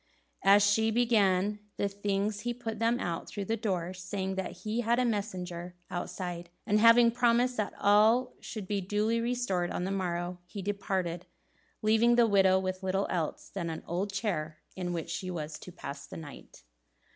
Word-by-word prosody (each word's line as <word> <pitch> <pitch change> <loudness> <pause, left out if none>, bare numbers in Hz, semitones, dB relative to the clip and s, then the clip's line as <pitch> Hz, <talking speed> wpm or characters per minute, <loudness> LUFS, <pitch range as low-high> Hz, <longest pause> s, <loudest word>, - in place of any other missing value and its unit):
As 200 +1 +7
she 220 +2 +3
gave 210 -4 +2 0.2
the 200 - +1
things 200 +1 -1
he 240 +2 -3
put 225 -3 -5
them 230 +2 +2
out 170 -1 -3
through 200 -2 -4
the 225 - 0
door, 185 -5 -2
saying 190 +1 -3
that 190 0 -3
he 220 +3 -1
had 235 +1 +2
a 250 - +2
messenger 180 -5 -3 0.2
outside; 175 -1 -4 0.2
and 210 +1 +3
having 230 +1 +7
promised 245 +1 +2
that 210 -2 -2
all 220 +5 +4
should 210 -4 -7
be 200 0 -1
duly 210 +4 0
restored 230 -8 0
on - - -2
the 190 - -2
morrow, 180 -2 -2
he 195 +1 -7
departed, 185 -3 -2 0.6
leaving 225 +2 +4
the 240 -1 +6
widow 195 -3 +5
with 185 0 -2
little 190 +1 0
else 165 -4 -2
than 175 -4 -4
an 160 - -5
old 185 +4 -2
chair 175 -7 -2 0.2
in 180 -1 -3
which 165 -1 -4
she 185 +3 -3
was 155 -3 -5
to 180 - -10
pass 140 -5 -8
the - - -9
night. 150 -3 -11
200 Hz, 180 wpm, -30 LUFS, 180-220 Hz, 0.6 s, As